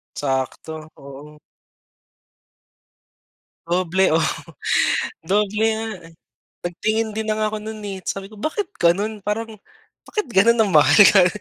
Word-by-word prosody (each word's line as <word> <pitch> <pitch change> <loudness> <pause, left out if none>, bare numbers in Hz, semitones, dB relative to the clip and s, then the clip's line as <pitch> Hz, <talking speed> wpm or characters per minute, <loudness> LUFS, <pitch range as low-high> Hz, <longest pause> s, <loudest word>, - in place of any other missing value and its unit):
Sakto, 145 +3 -3
oo. 145 +2 -12 2.3
Doble, 185 +1 +1
oo, 165 - +2 1.0
doble 210 +2 +1
nga, 225 0 -4 0.2
eh. 165 - -19 0.5
Nagtingin 215 +5 -1
din 220 +1 -4
na 215 - 0
nga 215 0 0
ako 215 - -4
no'n, 215 0 -8
eh, 195 -2 -5
sabi 195 +1 -4
ko, 215 - -14
"Bakit 355 - -3
gano'n, 205 +6 +1
parang 215 +2 -4 0.5
bakit 425 -7 -3
gano'n 230 +3 +4
ang 200 - 0
mahal?" 145 -1 +5 0.2
Ka 190 -3 +6
200 Hz, 125 wpm, -21 LUFS, 165-220 Hz, 2.3 s, Ka